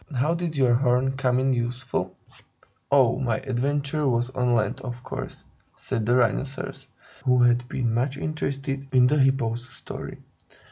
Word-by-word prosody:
How 145 +7 +2
did 170 -2 -3
your 130 -3 +4
horn 125 +1 +2
come 130 -2 +1
in 130 +1 +2
useful?" 120 -6 -3 0.7
"Oh, 130 -4 +4
my 120 -5 0
adventure 140 +3 -1
was 120 0 +1
on 125 -2 +1
land, 110 - 0
of 125 -1 -7
course," - - -7 0.3
said 110 -1 -3
the 120 - +4
Rhinoceros, 135 +2 -1 0.4
who 125 -2 +4
had 120 0 +3
been 120 -4 -1
much 130 +4 0
interested 140 -2 -3
in 130 -2 +5
the 145 +4 +3
Hippo's 130 -2 +1
story. - - -8
130 Hz, 150 wpm, -25 LUFS, 120-135 Hz, 0.7 s, in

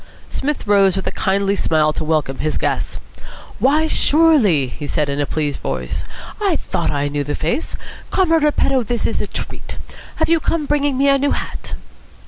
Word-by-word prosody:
Psmith 295 +2 -2
rose 200 -2 +4
with 195 - -3
a - - -1
kindly 195 +1 +1
smile 155 -4 +2
to 155 - -3
welcome 155 -4 0
his 155 0 -1
guests. - - -1 0.6
"Why, 300 +4 +3
surely!" 290 - +4
he 145 +4 -7
said 150 -1 0
in 140 +1 -1
a 145 - -1
pleased 150 -2 -2
voice. - - -3 0.4
"I 390 -5 +2
thought 170 - -2
I 145 -1 0
knew 145 0 -2
the 145 +1 -3
face. 170 - -2 0.3
Comrade 330 -4 +3
Repetto, 275 -3 +2
this 240 +1 -2
is - - -1
a - - -2
treat. - - -6 0.4
Have 320 - +1
you 330 0 +3
come 315 -1 -1
bringing 285 -2 +1
me 275 +1 +3
a 275 0 +4
new 285 +1 +2
hat?" - - -5
200 Hz, 185 wpm, -19 LUFS, -, 0.6 s, rose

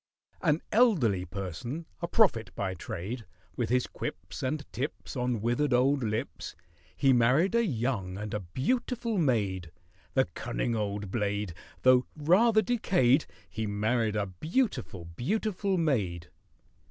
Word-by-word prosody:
AN 155 -2 +2
elderly 145 - +3
person—a 105 - -5
prophet 125 - +3
by 95 -1 -2
trade— 100 +7 -5 0.3
With 120 - -1
his 125 +1 +2
quips - - -6
and 145 +3 -2
tips 135 +5 -4
On 125 -3 -1
withered 120 +5 +1
old 135 +2 +3
lips, 110 - -3 0.4
He 135 -2 +4
married 130 - +4
a 235 0 +4
young 115 - -1
and 105 0 -5
a 105 - 0
beautiful 225 - -1
maid; 100 - +1 0.5
The 130 -1 +4
cunning 120 0 -3
old 100 -2 -3
blade! 105 -4 -1 0.3
Though 130 0 +5
rather 215 +9 +4
decayed, 165 - +3 0.2
He 110 -1 -4
married 110 +2 0
a 105 -1 +1
beautiful, 125 - -2
beautiful 195 - -1
maid. 105 - 0
125 Hz, 130 wpm, -29 LUFS, 105-160 Hz, 0.5 s, Though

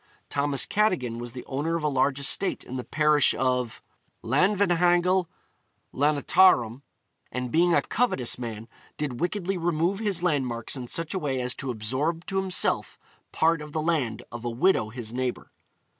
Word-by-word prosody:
Thomas 140 -1 +1
Cadogan 170 - 0
was 120 -1 -6
the 125 - -8
owner 150 +5 -2
of 165 - -3
a - - +2
large 135 0 +1
estate 150 +7 +2
in 130 - -8
the 125 - -3
parish 150 -1 +3
of 125 -2 -1 0.4
Llanvihangel 180 - +2 0.7
Llantarnam, 140 -3 +3 0.5
and 125 0 -4
being 170 +3 +3
a 145 - +3
covetous 170 - 0
man 115 -2 -6 0.3
did 140 -5 -3
wickedly 180 +2 -2
remove 170 +3 0
his 200 -6 -1
landmarks 130 -9 -1
in 125 -2 -6
such 165 +4 -3
a 190 - -1
way 135 -5 -2
as 125 0 0
to 135 - -6
absorb 130 +9 -2
to 195 - -3
himself 190 -1 0 0.3
part 165 0 +2
of 150 0 -9
the 160 - -1
land 155 -8 -1
of 120 0 -7
a 120 - -2
widow 120 - +2
his 115 -1 -6
neighbour. 125 0 -3
145 Hz, 160 wpm, -26 LUFS, 125-175 Hz, 0.7 s, parish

